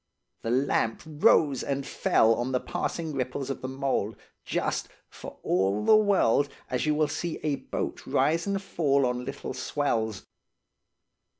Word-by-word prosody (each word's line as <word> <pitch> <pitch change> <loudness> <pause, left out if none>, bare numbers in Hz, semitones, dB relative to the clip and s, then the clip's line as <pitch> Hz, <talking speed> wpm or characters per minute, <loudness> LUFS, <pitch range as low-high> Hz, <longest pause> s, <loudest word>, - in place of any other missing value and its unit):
The 115 - -3
lamp 125 -2 +1
rose 150 -2 +3
and 140 -1 -2
fell 115 -5 +3
on 120 +3 -2
the 125 - +2
passing 160 +3 -3
ripples 130 +1 -2
of - - -6
the 130 - -4
mould, 130 -5 -1 0.3
just–for - - -4
all 95 +3 +1
the - - +7
world–as 145 - +2
you 150 - +3
will 155 0 +2
see 160 +2 -3
a 145 -2 0
boat - - -5
rise 165 +4 +1
and 200 -1 0
fall 145 -8 +1
on 125 0 -2
little - - -5
swells. 115 -6 -1
135 Hz, 140 wpm, -27 LUFS, 125-155 Hz, 0.3 s, the